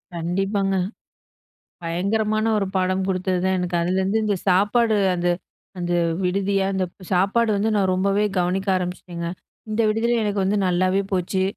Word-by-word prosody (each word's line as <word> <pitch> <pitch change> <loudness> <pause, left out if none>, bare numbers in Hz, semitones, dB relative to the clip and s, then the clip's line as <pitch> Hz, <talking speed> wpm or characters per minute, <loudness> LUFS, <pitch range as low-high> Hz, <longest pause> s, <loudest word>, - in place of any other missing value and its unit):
கண்டிப்பாங்க. 195 +3 0 1.1
பயங்கரமான 215 +6 0
ஒரு 200 - 0
பாடம் 185 0 +1
குடுத்தது 185 -1 0
தான் 190 - +2
எனக்கு. 180 -1 -2
அதிலருந்து 190 +4 +1
இந்த 205 -2 +1
சாப்பாடு 210 +4 +3 0.2
அந்த 175 0 -1 0.5
அந்த 175 0 -1 0.3
விடுதிய 195 +2 +1
அந்தப் 185 0 -4
சாப்பாடு 200 +5 +2
வந்து 210 +2 +1
நான் 195 -2 +2
ரொம்பவே 195 +2 +1
கவனிக்க 185 +3 0
ஆரம்பிச்ட்டேங்க. 180 -1 -4 0.4
இந்த 215 +2 0
விடுதில 230 +3 +1
எனக்கு 205 -1 -1
வந்து 200 +2 +1
நல்லாவே 185 +2 +2
போச்சு. 185 +1 0
190 Hz, 135 wpm, -22 LUFS, 180-205 Hz, 1.1 s, சாப்பாடு